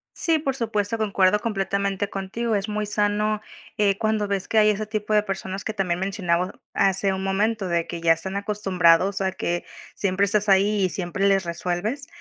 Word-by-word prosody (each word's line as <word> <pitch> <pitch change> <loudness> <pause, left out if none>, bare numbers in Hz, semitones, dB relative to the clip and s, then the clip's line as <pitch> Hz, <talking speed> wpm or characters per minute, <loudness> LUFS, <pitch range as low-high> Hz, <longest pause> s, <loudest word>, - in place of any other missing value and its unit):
Sí, 325 -2 +5
por 275 -3 -2
supuesto, 225 -3 -1
concuerdo 200 -2 +2
completamente 200 -1 -1
contigo. 210 +4 -2
Es 200 +1 -1
muy 210 0 -2
sano, 210 +1 0 0.4
eh, 200 -2 +2
cuando 215 -1 0
ves 200 -2 -2
que 225 - -1
hay 215 0 +6
ese 210 +1 -1
tipo 215 0 -3
de 210 -1 +4
personas 195 -1 -5
que 220 - -3
también 180 -4 -1
mencionamos 185 -2 0 0.2
hace 195 0 +2
un 190 0 -4
momento, 200 +1 0
de 170 -1 0
que 170 -1 -6
ya 165 0 +4
están 190 +4 -5
acostumbrados 195 -2 +2
a 190 0 0
que 175 -2 -2 0.3
siempre 195 0 +1
estás 210 +1 0
ahí, 200 +1 +3
y - - 0
siempre 180 +2 -2
les 195 -1 +3
resuelves. 180 - -3
200 Hz, 185 wpm, -24 LUFS, 190-210 Hz, 0.4 s, hay